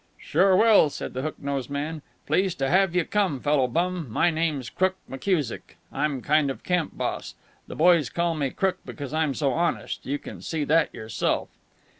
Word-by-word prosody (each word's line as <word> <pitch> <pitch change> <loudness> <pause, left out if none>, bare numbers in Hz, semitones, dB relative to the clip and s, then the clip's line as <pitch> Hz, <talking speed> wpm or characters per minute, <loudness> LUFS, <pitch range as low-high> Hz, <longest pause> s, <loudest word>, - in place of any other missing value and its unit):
"Sure 185 +4 +3
will," 215 -6 +6
said - - -6
the 130 - -3
hook 155 +3 -4
nosed 140 -2 -3
man. 150 +3 -3 0.2
"Pleased 190 -1 +1
to 135 0 0
have 190 -1 +3
you 180 -2 +2
come, 195 -10 0
fellow 145 -1 +2
bum. 170 +4 -1
My 170 +10 +2
name's 155 -6 -1
Crook 185 0 0
McKusick. 145 - -2 0.2
I'm 145 -4 -1
kind 150 -1 +3
of 135 - -6
camp 180 -3 -1
boss. - - -3 0.3
The - - -8
boys 170 -2 +4
call 170 -1 0
me 145 -4 -1
'Crook' 190 +7 -1
because 140 -2 -7
I'm 155 -3 +1
so 140 -3 +1
honest. 170 +4 -1
You 140 +2 0
can - - -10
see 160 -2 -2
that 160 +3 +3
yourself." 110 0 -2
155 Hz, 185 wpm, -25 LUFS, 140-180 Hz, 0.3 s, will